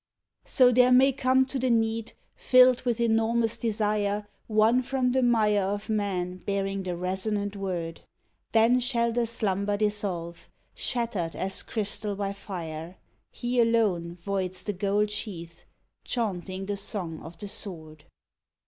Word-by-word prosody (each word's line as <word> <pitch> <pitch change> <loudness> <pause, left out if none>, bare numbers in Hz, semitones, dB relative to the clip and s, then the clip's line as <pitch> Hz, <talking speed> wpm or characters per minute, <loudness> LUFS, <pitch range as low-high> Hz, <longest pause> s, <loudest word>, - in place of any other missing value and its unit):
So 250 -1 +5
there 250 +1 +5
may 260 +2 +6
come 260 0 +2
to 265 0 -3
the 255 0 +1
need, 225 0 0 0.2
filled 255 -1 +5
with 240 -1 0
enormous 225 0 +2
de 235 - -2
sire, 210 -1 0 0.2
One 220 +3 +4
from 255 0 0
the 260 +1 +2
mire 215 -4 +3
of 205 +3 -3
men 190 -4 -1
bearing 195 +1 -2
the 180 -2 -4
resonant 200 +3 -2
word, 175 -4 -4 0.5
Then 230 +3 +4
shall 235 -2 +1
the 235 0 0
slumber 205 -2 0
dissolve, 200 -5 -2 0.2
shattered 225 -9 -1
as 190 0 -2
crystal 210 -1 -3
by 200 0 -2
fire, 170 -3 -7 0.3
He 245 +1 -2
alone 205 -8 +1
voids 185 -1 -3
the 205 - -2
gold 205 +2 0
sheath, 170 -6 -6 0.4
chaunting 195 -4 -3
the 205 0 -3
song 190 -5 -4
of 165 +1 -10
the 205 - -6
sword. 160 -7 -6
205 Hz, 140 wpm, -27 LUFS, 190-235 Hz, 0.5 s, may